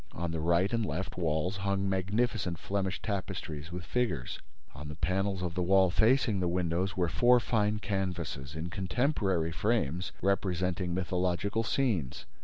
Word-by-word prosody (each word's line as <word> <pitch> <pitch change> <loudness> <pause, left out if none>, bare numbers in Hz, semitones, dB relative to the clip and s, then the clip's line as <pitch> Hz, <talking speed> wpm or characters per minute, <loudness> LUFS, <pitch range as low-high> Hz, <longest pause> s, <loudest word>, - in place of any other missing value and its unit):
On 85 0 -3
the 80 - -2
right 85 +6 +2
and 115 -1 +1
left 95 -2 -3
walls 85 +2 0
hung 100 0 0
magnificent 95 0 0
Flemish 95 +1 -2
tapestries 90 -6 -4
with 90 0 -6
figures. 90 - -1 0.3
On 75 +2 -8
the 75 - -6
panels 95 +3 0
of 85 -2 -2
the 90 - -1
wall 95 0 +4
facing 110 0 +3
the 90 - +1
windows 90 +2 0
were 90 -2 +2
four 125 +7 +5
fine 105 -2 +1
canvases, 85 -9 -3
in 80 +2 -4
contemporary 95 - 0
frames, 90 - 0
representing 90 -2 0
mythological 90 +3 0
scenes. 110 - 0
95 Hz, 150 wpm, -31 LUFS, 85-100 Hz, 0.3 s, four